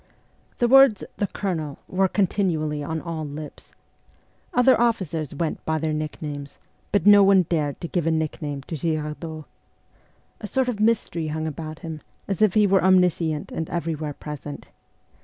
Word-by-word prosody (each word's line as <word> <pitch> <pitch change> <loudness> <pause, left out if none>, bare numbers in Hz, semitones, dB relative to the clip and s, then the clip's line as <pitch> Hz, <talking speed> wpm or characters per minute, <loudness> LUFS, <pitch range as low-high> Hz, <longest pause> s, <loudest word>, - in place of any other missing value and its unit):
The 240 - +2
words 270 -4 +6
' - - -41
the 205 - +1
Colonel 160 -9 -3
' - - -42
were 190 0 +4
continually 175 -7 0
on 160 +2 -3
all 165 -2 -4
lips. 150 +1 -8 0.8
Other 250 -1 +4
officers 170 - 0
went 160 +1 -3
by 160 0 0
their 155 0 -1
nicknames, 150 -2 -5 0.3
but 200 -4 +1
no 205 0 +8
one 195 -1 +6
dared 155 -4 -1
to 170 - -3
give 170 -1 -1
a - - +3
nickname 150 -2 -2
to 160 - -6
Girardot. 155 0 -3 0.9
A 210 - -5
sort 255 +5 0
of 225 -4 -3
mystery 215 -7 +1
hung 155 +1 -3
about 155 0 -5
him, 160 -2 -6 0.3
as 195 -2 -3
if 215 -2 +4
he 210 -1 +5
were 195 -1 +3
omniscient 180 -5 +2
and 160 - -4
everywhere 160 -3 -3
present. 145 -1 -8
160 Hz, 165 wpm, -24 LUFS, 155-195 Hz, 0.9 s, no